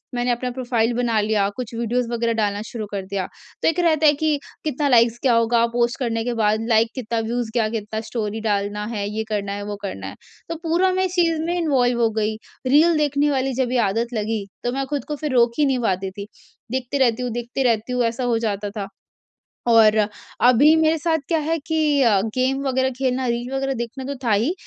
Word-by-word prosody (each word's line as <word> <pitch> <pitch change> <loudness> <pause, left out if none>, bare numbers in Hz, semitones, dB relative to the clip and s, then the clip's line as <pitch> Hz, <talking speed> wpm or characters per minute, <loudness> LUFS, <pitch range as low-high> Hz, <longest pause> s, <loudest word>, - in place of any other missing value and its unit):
मैंने 245 0 +1
अपना 250 +1 -2
प्रोफ़ाइल 240 -2 0
बना 235 -2 +1
लिया, 210 -1 +1
कुछ 245 -2 -5
वीडियोज़ 235 +1 -1
वगैरह 235 0 0
डालना 205 -2 -1
शुरू 220 -3 -5
कर 195 -2 -4
दिया। 195 -1 -3 0.4
तो - - +2
एक 330 +2 +2
रहता 315 -3 +3
है 295 - +6
कि 300 0 0 0.3
कितना 295 -1 0
लाइक्स 235 -2 +4
क्या 255 - +4
होगा 230 0 +3
पोस्ट 240 +2 0
करने 230 -3 -1
के 245 - -1
बाद, 215 0 +1
लाइक 225 0 +4
कितना, 230 -3 -2
व्यूज़ 230 0 -2
क्या? 230 -3 +2
कितना 220 0 -4
स्टोरी 220 -2 -3
डालना 205 +1 -1
है, 200 -1 -2
ये 220 +1 -3
करना 200 -2 -2
है, 205 0 -5
वो 205 0 -4
करना 100 - -5
है, - - -8 0.3
तो 330 - -2
पूरा 345 +3 +2
मैं 375 0 +1
इस 365 - -4
चीज़ 335 -3 +2
में 345 +2 -1
इन्वॉल्व 250 -7 +1
हो 230 - +4
गई। 215 0 -1 0.3
रील 315 +5 +5
देखने 290 0 +1
वाली 265 0 0
जब 245 - -3
ये - - +2
आदत 230 +4 -2
लगी, 215 -1 -2 0.2
तो 245 - 0
मैं 270 0 -1
खुद 290 -2 -3
को 300 - -3
फिर 295 -1 -3
रोक 235 -1 +4
ही 295 - +5
नहीं 265 -2 +1
पाती 190 0 -2
थी, 200 +1 -8 0.4
देखती 260 +1 -2
रहती 250 -2 +2
हूँ 245 - -2
देखती 240 +3 -3
रहती 230 0 +1
हूँ, 250 - +1
ऐसा 230 +2 -2
हो 235 -2 +1
जाता 205 0 -3
था। 200 -1 -3 0.8
और 220 -2 +6 0.5
अभी 285 +6 +6
मेरे 320 0 +3
साथ 320 +1 +1
क्या 330 - +2
है 320 +2 0
कि 320 - -1 0.3
अ, 215 -6 +4
गेम 260 +2 +1
वगैरह 260 0 +1
खेलना, 260 -1 0
रील 240 +2 -2
वगैरह 270 0 -1
देखना 240 +3 -5
तो 280 - -4
था 225 - +2
ही, 225 +10 +2
240 Hz, 225 wpm, -22 LUFS, 220-270 Hz, 0.8 s, है